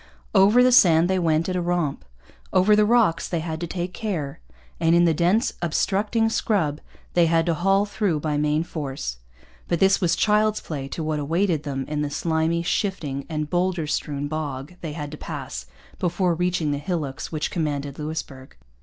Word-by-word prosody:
Over 210 +5 +6
the 255 - +5
sand 175 -9 +6
they 190 - +2
went 165 -1 +1
at 185 - -2
a 180 - 0
romp. 175 -5 -1 0.5
Over 190 +3 +5
the 210 0 +4
rocks 230 -7 +3
they 170 - -1
had 160 0 -4
to 170 - -2
take 180 +1 -4
care; 170 -11 -4 0.4
and 165 0 +3
in 175 0 +5
the 165 - +3
dense, 180 - +2
obstructing 205 +6 +1
scrub 180 -9 0 0.3
they 170 -1 +4
had 165 0 +2
to 170 - +1
haul 195 +4 +2
through 200 -6 -1
by 150 0 -1
main 150 +2 +1
force. 135 - -5 0.5
But 170 - 0
this 195 +1 +4
was 170 -2 +2
child's 215 +3 +2
play 140 -4 -5
to 160 +4 -5
what 155 -1 -1
awaited 165 +2 0
them 135 -2 -4
in 150 0 -2
the 150 - -1
slimy, 160 +2 0
shifting, 170 -7 -2
and 155 -2 -2
boulder 180 -2 0
strewn 145 -1 -2
bog 145 0 -4
they 160 -3 -5
had 150 -2 -6
to 155 - -7
pass 60 - -6 0.3
before 180 0 +1
reaching 175 -2 0
the 145 - -1
hillocks 150 -4 -4
which 155 -2 -2
commanded 145 -4 -3
Louisbourg. 150 -4 -6
165 Hz, 185 wpm, -24 LUFS, 150-185 Hz, 0.5 s, Over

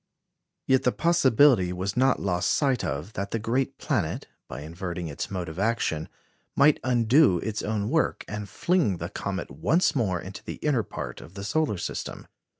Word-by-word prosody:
Yet 130 -1 +4
the 125 - +2
possibility 135 - +4
was 95 +2 -3
not 130 +1 +3
lost 90 -3 0
sight 135 -5 +1
of 75 +10 -4
that 100 +1 -3
the 115 - -1
great 120 +5 -1
planet, - - -1 0.2
by 60 +3 -7
inverting 85 +2 -5
its 70 - -5
mode 90 -3 -4
of 80 +2 -7
action, 100 -8 0 0.5
might 150 +1 +5
undo 125 - +4
its 110 +4 -3
own 105 -1 -1
work, 160 +6 0
and 105 -1 -5
fling 155 - +1
the - - -5
comet - - -4
once 155 - +2
more 100 -9 +1
into 95 +4 -9
the - - -6
inner 145 -6 +1
part - - -7
of 85 +4 -13
the 100 - -6
solar 145 -1 0
system. - - -5
105 Hz, 175 wpm, -26 LUFS, 90-130 Hz, 0.5 s, might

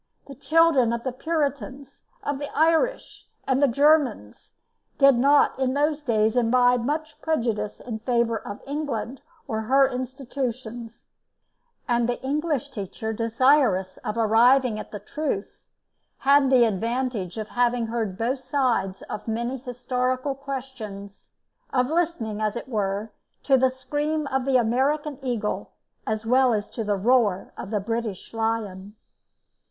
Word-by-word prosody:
The 280 - -10
children 310 -4 +3
of 235 0 -3
the 260 - -2
Puritans, 280 -3 -3 0.2
of 285 -1 -2
the 285 - -5
Irish 330 +11 +1 0.2
and 265 0 +1
the 285 - +6
Germans, 275 - +2 0.5
did 275 -1 +7
not 280 +3 +4
in 260 0 0
those 295 +1 +1
days 220 -4 +1
imbibe 245 +1 +3
much 305 +3 -3
prejudice 230 -9 -1
in 225 -3 -6
favour 235 -1 +1
of 205 -1 -8
England 275 -3 -4 0.3
or 220 -1 -2
her 270 +4 +4
institutions, 250 -3 -5 0.8
and 240 -1 +1
the 245 - -1
English 295 0 -1
teacher 220 +2 -5
desirous 230 -4 +2
of 210 - -5
arriving 230 +1 +4
at - - -8
the 210 - -6
truth, 210 0 -4 0.6
had 280 0 +4
the 255 -2 +6
advantage 225 -2 -2
of 215 0 -5
having 245 -1 +1
heard 225 -4 -3
both 245 +5 -1
sides 250 -7 -1
of 210 - -7
many 235 +4 -2
historical 255 +1 -2
questions; 255 -8 -8 0.4
of 250 -1 +2
listening, 310 -11 -1
as 215 0 0
it 235 - -6
were, 210 -2 -2 0.3
to 270 - +4
the 260 0 +4
scream 295 +4 -2
of 265 -1 0
the 270 -1 +3
American 270 +5 0
eagle, 240 -5 -2 0.4
as 220 0 -2
well 255 +1 +4
as 205 -1 -4
to 225 - -4
the 205 -1 0
roar 215 -2 +2
of - - -7
the 210 -1 0
British 225 -1 -4
lion. 215 -3 -3
245 Hz, 140 wpm, -25 LUFS, 220-275 Hz, 0.8 s, did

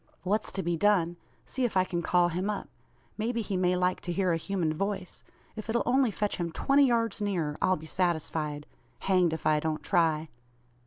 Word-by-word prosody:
"What's 205 +4 0
to 190 - -2
be 170 0 0
done? 175 -3 +2 0.3
See 260 - -3
if 235 -5 +1
I 185 - +5
can 175 -2 -2
call 175 +1 +3
him 180 +4 -2
up. 205 -2 -3 0.5
May 225 +3 0
be 230 -2 -2
he 200 -1 -3
may 180 0 +2
like 180 0 0
to 175 - -4
hear 185 -1 +1
a - - +1
human 170 -2 -1
voice. 195 +2 -3 0.3
If 215 0 -7
it'll 235 +1 +1
only 255 0 +3
fetch 210 0 -2
him 170 -2 -2
twenty 275 +10 +3
yards 230 -3 0
nearer, 175 -8 -1
I'll 185 - +3
be 155 - -10
satisfied. 160 -4 -1 0.4
Hanged 185 -3 +3
if 160 - -5
I 155 -1 +4
don't 155 0 -2
try." 160 -2 +1
180 Hz, 205 wpm, -29 LUFS, 165-205 Hz, 0.5 s, I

